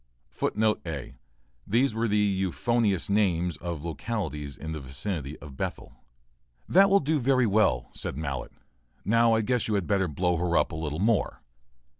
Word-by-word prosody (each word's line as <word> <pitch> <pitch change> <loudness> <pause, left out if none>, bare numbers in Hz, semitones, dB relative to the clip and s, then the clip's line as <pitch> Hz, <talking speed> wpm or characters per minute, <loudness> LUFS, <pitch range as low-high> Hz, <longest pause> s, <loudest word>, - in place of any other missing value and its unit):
[A] 75 -6 -6 0.5
These 120 +4 +2
were 115 +1 0
the 105 0 +1
euphonious 100 +1 +1
names 90 -4 +1
of 85 -3 -5
localities 75 - -4
in 80 - -6
the 80 - -4
vicinity 70 +2 -5
of 70 -2 -11
Bethel. - - -5 0.7
["That 195 +3 +6
will 200 +1 +5
do 155 +1 +1
very 130 -1 +3
well," 95 - +2
said 65 - -5
Mallett. 70 -4 -4 0.5
"Now 115 +1 +4
I 110 - +3
guess 125 +1 0
you 110 - 0
had 100 -3 0
better 95 -1 +1
blow 90 +3 0
her 85 0 +1
up - - +2
a - - -5
little 80 -1 -3
more." 105 +4 0
95 Hz, 160 wpm, -27 LUFS, 80-115 Hz, 0.7 s, That